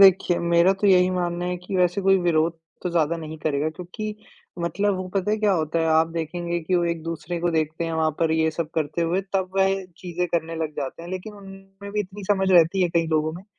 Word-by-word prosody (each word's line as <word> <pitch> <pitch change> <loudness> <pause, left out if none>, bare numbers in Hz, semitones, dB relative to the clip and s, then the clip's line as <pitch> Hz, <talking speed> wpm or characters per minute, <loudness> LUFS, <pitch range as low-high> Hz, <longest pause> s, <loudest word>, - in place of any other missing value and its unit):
देखिए 190 -2 +6
मेरा 170 +2 +4
तो 205 - +3
यही 185 -1 +5
मानना 175 -1 -1
है 180 0 -1
कि 180 +2 -5
वैसे 180 +1 +2
कोई 195 0 +5
विरोध 165 -1 +1 0.2
तो 180 - -2
ज़्यादा 170 -1 +1
नहीं 160 -1 -7
करेगा 150 0 0
क्योंकि 180 +6 -6 0.4
मतलब 200 +4 0
वो 185 0 -4
पता 195 +1 0
है 215 - +2
क्या 210 -2 +3
होता 160 -2 0
है, 165 - +1
आप 160 +1 +4
देखेंगे 170 +1 -2
कि 180 +3 -1
वो 175 - +2
एक-दूसरे 165 0 -3
को 175 0 +1
देखते 160 +1 -1
हैं 165 - -3
वहाँ 160 -1 +1
पर 160 -1 +2
ये 160 0 +2
सब 160 0 -4
करते 155 +1 -1
हुए, 170 +3 +1
तब 190 -1 0
वह 195 0 +2
चीज़ें 180 0 -2
करने 165 -1 -1
लग 160 -1 -2
जाते 140 +3 -4
हैं, 175 - -8
लेकिन 185 +3 -6
उनमें 195 0 -11
भी 210 - 0
इतनी 200 +1 -7
समझ 190 -2 +2
रहती 180 +1 +5
है, 180 - +3
कई 165 -1 +1
लोगों 155 0 +1
में, 180 +4 -9
175 Hz, 235 wpm, -24 LUFS, 160-190 Hz, 0.4 s, देखिए